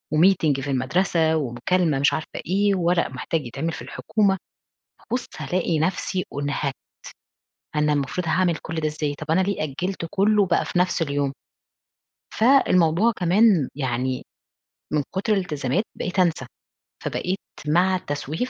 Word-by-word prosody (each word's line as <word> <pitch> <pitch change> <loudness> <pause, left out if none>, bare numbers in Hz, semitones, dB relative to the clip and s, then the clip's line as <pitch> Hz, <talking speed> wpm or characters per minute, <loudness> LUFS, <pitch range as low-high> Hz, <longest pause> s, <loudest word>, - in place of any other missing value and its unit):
وmeeting 160 -5 +4
في 140 0 -3
المدرسة، 160 +5 +1
ومكالمة 150 +4 0
مش 140 - +3
عارفة 155 - -3 0.2
إيه، 200 +3 +2
ورق 175 -1 +2
محتاج 140 +2 -3
يتعمل 145 +7 -3
في - - -7
الحكومة، 200 -3 0 0.7
ابُص 245 +2 -1
ألاقي 175 -3 0
نفسي 185 +2 -1 0.2
أُنهكت، 140 -1 -1 1.0
أنا 150 0 +2
المفروض 145 +5 -2
هاعمل 175 +1 +2
كل 165 - -6
ده 155 -1 0
إزاي، 150 -1 -2
طب 155 +2 -5
أنا 185 - +4
ليه 195 -3 -1
أجلت 170 +5 -3
كله 205 +1 +3
بقى 175 -2 +1
في 175 - -1
نفس 180 -1 +1
اليوم، 140 -3 0 1.0
فالموضوع 220 - +4
كمان 180 - +4
يعني 130 -2 -2 0.7
من 150 -1 +2
كُتر 200 +3 0
الالتزامات 170 - -1
بقيت 185 +1 -3
أنسى، 165 -7 +2 0.6
فبقيت 185 +2 -2 0.3
مع 180 +5 +3
التسويف 155 - -3
165 Hz, 135 wpm, -23 LUFS, 145-185 Hz, 1.0 s, وmeeting